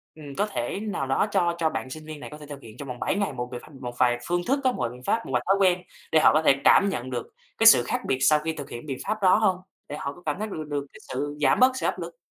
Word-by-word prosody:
ừm, 145 Hz, -3 st, -10 dB
có 205 Hz, -, +2 dB
thể 195 Hz, -, -3 dB
nào 205 Hz, -10 st, -3 dB
đó 135 Hz, +10 st, +1 dB
cho 175 Hz, -3 st, +1 dB
cho 160 Hz, -, +2 dB
bạn 115 Hz, -1 st, -5 dB
sinh 155 Hz, +3 st, -8 dB
viên 155 Hz, -1 st, -8 dB
này 150 Hz, -, -8 dB
có 150 Hz, -, -9 dB
thể 150 Hz, -, -11 dB
thực 145 Hz, -1 st, -9 dB
hiện 110 Hz, +1 st, -13 dB
trong 140 Hz, -, -8 dB
vòng 125 Hz, -1 st, -6 dB
7 -, -, 0 dB
ngày, 200 Hz, -8 st, -1 dB
một 125 Hz, -1 st, -5 dB
vài 125 Hz, -, -5 dB
ph -, -, -16 dB
một 120 Hz, 0 st, -5 dB
vài 120 Hz, -1 st, +3 dB
phương 175 Hz, 0 st, +1 dB
thức 275 Hz, +3 st, +2 dB
á, 255 Hz, -, +3 dB
một -, -, -5 dB
vài 120 Hz, -, 0 dB
biện 125 Hz, +1 st, -13 dB
pháp, 230 Hz, -, 0 dB
một -, -, -6 dB
vài 125 Hz, -, +1 dB
thói 195 Hz, -, +4 dB
quen 180 Hz, -2 st, +3 dB, 0.3 s
để 160 Hz, -, +5 dB
họ -, -, +8 dB
có 155 Hz, -, +4 dB
thể 135 Hz, -, +6 dB
cảm 200 Hz, -, +6 dB
nhận 130 Hz, -7 st, -4 dB
được 120 Hz, -2 st, -4 dB, 0.3 s
cái 225 Hz, -, +6 dB
sự 125 Hz, -, +8 dB
khác -, -, -2 dB
biệt 130 Hz, -, 0 dB
sau 150 Hz, +2 st, +5 dB
khi 160 Hz, +1 st, -3 dB
thực 145 Hz, -3 st, -8 dB
hiện 120 Hz, -, -8 dB
biện 135 Hz, -3 st, -4 dB
pháp 215 Hz, -1 st, -2 dB
đó 185 Hz, -1 st, +6 dB
hông? 210 Hz, -4 st, +2 dB, 0.3 s
Để 145 Hz, -, -5 dB
họ 140 Hz, -1 st, -4 dB
có 175 Hz, -, -16 dB
cảm 150 Hz, +4 st, -2 dB
thấy 215 Hz, -, -2 dB
mình 160 Hz, -, -6 dB
được 155 Hz, -, -6 dB
được 145 Hz, -1 st, -2 dB
cái -, -, -13 dB
sự 145 Hz, +3 st, -3 dB
giảm 145 Hz, -, +3 dB
bớt 255 Hz, +1 st, +6 dB
sự -, -, -3 dB
áp -, -, -1 dB
lực? 170 Hz, 0 st, -7 dB
150 Hz, 335 wpm, -25 LUFS, 130-185 Hz, 0.3 s, họ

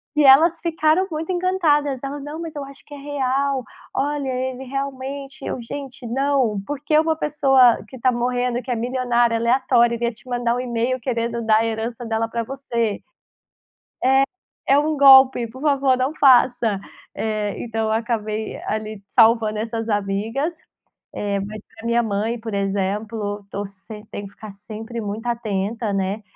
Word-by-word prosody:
E 300 Hz, -, +4 dB
elas 315 Hz, +5 st, +6 dB
ficaram 330 Hz, +1 st, +2 dB
muito 315 Hz, +2 st, -4 dB
encantadas, 325 Hz, -7 st, +1 dB
ela: 280 Hz, +1 st, -5 dB
"Não 295 Hz, +3 st, -7 dB
mas 325 Hz, -2 st, -6 dB
eu 290 Hz, -, -4 dB
acho 275 Hz, 0 st, -13 dB
que 295 Hz, -, -13 dB
é -, -, -7 dB
real, 275 Hz, -2 st, -1 dB, 0.3 s
olha 285 Hz, 0 st, -1 dB
ele 260 Hz, 0 st, -3 dB
realmente", 275 Hz, +1 st, -5 dB
eu: 250 Hz, -, -3 dB
"Gente, 265 Hz, +1 st, -7 dB
não, 260 Hz, -4 st, +1 dB
porque 290 Hz, +3 st, 0 dB
uma 320 Hz, 0 st, +2 dB
pessoa 270 Hz, -7 st, +4 dB
que 260 Hz, +3 st, -11 dB
tá 255 Hz, +1 st, +2 dB
morrendo 245 Hz, 0 st, 0 dB
que 255 Hz, -, -5 dB
é -, -, +1 dB
milionária 240 Hz, 0 st, +1 dB
aleatória 240 Hz, 0 st, +3 dB
iria 235 Hz, 0 st, -1 dB
te 235 Hz, -, -22 dB
mandar 240 Hz, -1 st, 0 dB
um -, -, -2 dB
email 245 Hz, +1 st, -1 dB
querendo 235 Hz, -1 st, -2 dB
dar 215 Hz, -1 st, +5 dB
a 225 Hz, -, +2 dB
herança 225 Hz, +2 st, -3 dB
dela 225 Hz, 0 st, -1 dB
pra 230 Hz, 0 st, -2 dB
você? 235 Hz, -4 st, -2 dB, 1.7 s
É 275 Hz, -, +6 dB
é -, -, +5 dB
um 305 Hz, +1 st, +1 dB
golpe, 265 Hz, -3 st, +7 dB
por 260 Hz, +4 st, -12 dB
favor 275 Hz, -3 st, +3 dB
não 260 Hz, +4 st, -1 dB
faça". 245 Hz, -6 st, +4 dB, 0.3 s
Eh 215 Hz, -2 st, -2 dB
então 225 Hz, -1 st, -2 dB
eu -, -, 0 dB
acabei 220 Hz, -1 st, -2 dB
ali 215 Hz, -1 st, -4 dB
salvando 225 Hz, -2 st, +4 dB
essas 225 Hz, +1 st, -3 dB
amigas, 215 Hz, -, -1 dB, 0.6 s
eh, 200 Hz, -1 st, -1 dB
mas 210 Hz, +1 st, -7 dB
pra 225 Hz, 0 st, -11 dB
minha 235 Hz, 0 st, +2 dB
mãe 220 Hz, +2 st, -1 dB
por 225 Hz, -1 st, -6 dB
exemplo, 205 Hz, +1 st, -2 dB
tô 200 Hz, +1 st, -4 dB
semp 210 Hz, +2 st, -12 dB
tem 205 Hz, -, -6 dB
que 195 Hz, -, -13 dB
ficar 215 Hz, 0 st, -10 dB
sempre 220 Hz, +4 st, -7 dB
muito 210 Hz, +1 st, -5 dB
atenta, 220 Hz, -1 st, -2 dB
né, 195 Hz, +2 st, -2 dB
240 Hz, 165 wpm, -22 LUFS, 220-275 Hz, 1.7 s, golpe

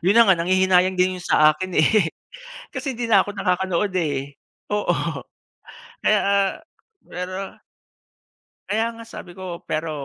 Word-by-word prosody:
'yun 190 Hz, +5 st, +3 dB
na 235 Hz, -, +8 dB
nga, 195 Hz, -, +6 dB
nanghihinayang 185 Hz, +1 st, +3 dB
din 185 Hz, 0 st, +2 dB
'yung -, -, -11 dB
sa 155 Hz, 0 st, +6 dB
akin 185 Hz, +3 st, -6 dB
eh, 175 Hz, +3 st, +4 dB, 0.7 s
kasi 260 Hz, +1 st, -3 dB
'di 235 Hz, 0 st, -4 dB
na 200 Hz, -4 st, +5 dB
ako 205 Hz, -, -6 dB
nakakanood 190 Hz, 0 st, -1 dB
eh, 140 Hz, -5 st, -2 dB, 0.3 s
oo, 210 Hz, 0 st, 0 dB, 1.1 s
kaya 215 Hz, -, +3 dB, 0.9 s
pero 185 Hz, +2 st, -6 dB, 1.1 s
kaya 220 Hz, +2 st, +1 dB
nga 230 Hz, 0 st, -11 dB
sabi 180 Hz, -5 st, -10 dB
ko 180 Hz, -2 st, -7 dB
pero, 155 Hz, +1 st, -2 dB
185 Hz, 135 wpm, -22 LUFS, 175-205 Hz, 1.1 s, na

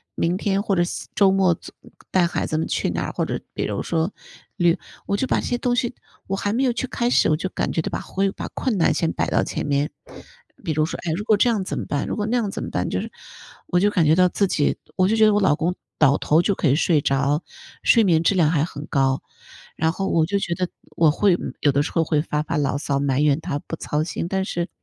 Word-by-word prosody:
明 175 Hz, +2 st, 0 dB
天 200 Hz, 0 st, 0 dB
或 200 Hz, -, 0 dB
者 175 Hz, -1 st, +2 dB
下 -, -, -6 dB
周 195 Hz, -2 st, +5 dB
末， 190 Hz, -3 st, +3 dB
总 -, -, -12 dB, 0.4 s
带 185 Hz, -2 st, +4 dB
孩 175 Hz, -, -2 dB
子 155 Hz, -, -1 dB
们 160 Hz, -, 0 dB
去 -, -, -1 dB
哪 -, -, -2 dB
儿， -, -, -4 dB
或 -, -, -1 dB
者 -, -, -3 dB
比 -, -, -2 dB
如 -, -, -3 dB
说 165 Hz, +4 st, -1 dB, 0.4 s
旅 175 Hz, -3 st, +3 dB, 0.3 s
我 200 Hz, -, 0 dB
就 260 Hz, -, -1 dB
把 -, -, +1 dB
这 -, -, -6 dB
些 245 Hz, -, 0 dB
东 245 Hz, 0 st, 0 dB
西 245 Hz, 0 st, 0 dB, 0.3 s
我 195 Hz, 0 st, -1 dB
还 205 Hz, +1 st, -1 dB
没 260 Hz, +3 st, +1 dB
有 250 Hz, -, +3 dB
去 250 Hz, +2 st, -3 dB
开 240 Hz, 0 st, -1 dB
始， -, -, +3 dB
我 155 Hz, -, +3 dB
就 185 Hz, +4 st, -3 dB
感 -, -, -2 dB
觉 160 Hz, -, +1 dB
到 -, -, -4 dB
把 -, -, -3 dB
会 195 Hz, 0 st, -1 dB
把 -, -, -6 dB
困 235 Hz, -7 st, -1 dB
难 165 Hz, -, +3 dB
先 165 Hz, -, 0 dB
摆 -, -, -1 dB
到 -, -, +2 dB
前 -, -, -4 dB
面。 145 Hz, +1 st, 0 dB, 0.7 s
比 165 Hz, -, -2 dB
如 155 Hz, 0 st, +1 dB
说， -, -, -5 dB
哎， 165 Hz, -, -1 dB
如 210 Hz, -, -5 dB
果 215 Hz, -1 st, +4 dB
这 240 Hz, +4 st, +3 dB
样 210 Hz, -5 st, 0 dB
怎 -, -, -4 dB
么 -, -, -4 dB
办？ 145 Hz, -, -2 dB
如 -, -, -2 dB
果 210 Hz, -, -2 dB
那 245 Hz, +2 st, +1 dB
样 215 Hz, -4 st, 0 dB
怎 -, -, -5 dB
么 -, -, -5 dB
办？ -, -, -2 dB
就 -, -, -1 dB
是 -, -, -7 dB, 0.6 s
我 180 Hz, -, +2 dB
就 205 Hz, +2 st, +3 dB
感 175 Hz, -6 st, +2 dB
觉 155 Hz, +2 st, +5 dB
到 180 Hz, 0 st, +4 dB
自 200 Hz, -, +1 dB
己 150 Hz, -5 st, +1 dB, 0.2 s
我 185 Hz, -1 st, +3 dB
就 220 Hz, -, +2 dB
觉 220 Hz, -, +5 dB
得 215 Hz, -, +5 dB
我 205 Hz, -, +2 dB
老 185 Hz, -6 st, +4 dB
公 170 Hz, +3 st, -1 dB, 0.2 s
倒 145 Hz, -2 st, +5 dB
头 160 Hz, +3 st, +3 dB
就 200 Hz, -, +2 dB
可 155 Hz, -, 0 dB
以 135 Hz, -, +4 dB
睡 155 Hz, -1 st, +2 dB
着， 140 Hz, +3 st, +1 dB, 0.4 s
睡 230 Hz, -, +5 dB
眠 165 Hz, -5 st, +3 dB
质 195 Hz, -, +3 dB
量 160 Hz, -4 st, +4 dB
还 150 Hz, -3 st, +2 dB
很 150 Hz, -3 st, -6 dB
高。 135 Hz, -1 st, +1 dB, 0.5 s
然 160 Hz, +1 st, +1 dB
后 195 Hz, +2 st, -3 dB
我 160 Hz, -1 st, +2 dB
就 200 Hz, -, 0 dB
觉 175 Hz, -, -2 dB
得 180 Hz, +1 st, -2 dB, 0.3 s
我 160 Hz, -2 st, +4 dB
会 195 Hz, +1 st, +3 dB, 0.2 s
有 145 Hz, -, +3 dB
的 140 Hz, +2 st, +2 dB
时 -, -, -5 dB
候 165 Hz, -, +2 dB
会 150 Hz, -1 st, +1 dB
发 150 Hz, -1 st, -2 dB
发 165 Hz, -, -3 dB
牢 140 Hz, -1 st, 0 dB
骚 140 Hz, -1 st, -1 dB
埋 140 Hz, -1 st, 0 dB
怨 150 Hz, +1 st, +2 dB
他 145 Hz, -, -3 dB
不 165 Hz, -, -6 dB
操 150 Hz, -1 st, -2 dB
心， 170 Hz, +1 st, -4 dB
但 190 Hz, 0 st, 0 dB
是 175 Hz, -2 st, -3 dB
175 Hz, 295 characters per minute, -22 LUFS, 155-200 Hz, 0.7 s, 周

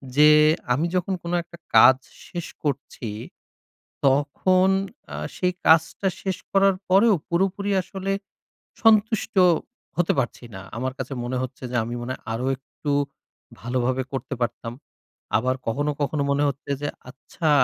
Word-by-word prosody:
যে 150 Hz, +1 st, +7 dB, 0.4 s
আমি 150 Hz, +7 st, +1 dB
যখন 185 Hz, +1 st, 0 dB
কোন 170 Hz, -, -4 dB
একটা 170 Hz, 0 st, -14 dB, 0.2 s
কাজ 130 Hz, -, +8 dB, 0.3 s
শেষ 175 Hz, -2 st, -5 dB, 0.2 s
করছি, 135 Hz, -5 st, -3 dB, 1.0 s
তখন 150 Hz, +7 st, +3 dB, 0.5 s
আ -, -, -3 dB, 0.2 s
সেই 180 Hz, 0 st, +1 dB
কাজটা 165 Hz, +4 st, +4 dB, 0.2 s
শেষ 190 Hz, -2 st, -1 dB, 0.2 s
করার 195 Hz, 0 st, +4 dB, 0.2 s
পরেও, 205 Hz, +3 st, +6 dB
পুরোপুরি 195 Hz, +3 st, 0 dB
আসলে 195 Hz, +1 st, -4 dB, 0.7 s
সন্তুষ্ট 220 Hz, -1 st, +3 dB, 0.6 s
হতে 175 Hz, -1 st, +2 dB
পারছি 120 Hz, -1 st, -3 dB
না। 95 Hz, -, -7 dB, 0.2 s
আমার 130 Hz, +2 st, -2 dB
কাছে 130 Hz, +1 st, -5 dB
মনে 125 Hz, +1 st, -2 dB
হচ্ছে, 130 Hz, 0 st, -6 dB
যে -, -, -3 dB
আমি 120 Hz, +2 st, -4 dB
মনে 120 Hz, -, -4 dB
হয় -, -, -11 dB
আরো 120 Hz, +3 st, -2 dB
একটু 145 Hz, +2 st, -6 dB, 0.7 s
ভালোভাবে 125 Hz, +2 st, -1 dB
করতে 135 Hz, +1 st, -3 dB
পারতাম। 115 Hz, -1 st, -2 dB, 0.6 s
আবার 130 Hz, +3 st, 0 dB
কখনো, 145 Hz, +6 st, 0 dB
কখনো 145 Hz, 0 st, 0 dB
মনে 145 Hz, +1 st, +2 dB
হচ্ছে 140 Hz, +1 st, -6 dB
যে, 145 Hz, -, -1 dB, 0.2 s
"আচ্ছা 150 Hz, +4 st, -4 dB
145 Hz, 140 wpm, -24 LUFS, 130-185 Hz, 1.0 s, কাজ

